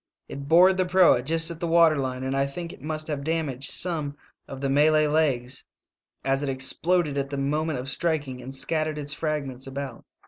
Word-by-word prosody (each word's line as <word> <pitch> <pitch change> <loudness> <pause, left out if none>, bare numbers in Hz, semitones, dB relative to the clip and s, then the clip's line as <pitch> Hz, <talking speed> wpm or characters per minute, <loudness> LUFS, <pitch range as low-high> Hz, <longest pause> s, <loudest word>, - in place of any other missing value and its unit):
It 140 0 -7
bored 180 +4 +6
the 185 - +2
proa 180 -8 +5
just 165 +5 0
at 165 - -8
the 170 - -2
water 165 -1 +5
line, 130 -1 -3
and 130 +1 -2
I 135 0 +1
think 170 +4 -6
it - - -15
must 155 +1 -4
have 150 -3 -4
damaged 145 -4 -2
some 155 -5 -3 0.3
of 135 - -8
the 140 - -1
Malay 155 +2 +4
legs, 140 -4 0 0.6
as 135 +1 +1
it 145 - -2
exploded 145 +3 0
at 140 0 -3
the 140 - -4
moment 150 +2 -1
of 125 - -5
strik 150 +2 0
ing 125 -1 -7
and 130 +2 -8
scattered 155 +3 -1
its 145 0 -3
fragments 140 -4 -3
about. 135 -2 -6
145 Hz, 205 wpm, -25 LUFS, 135-160 Hz, 0.6 s, bored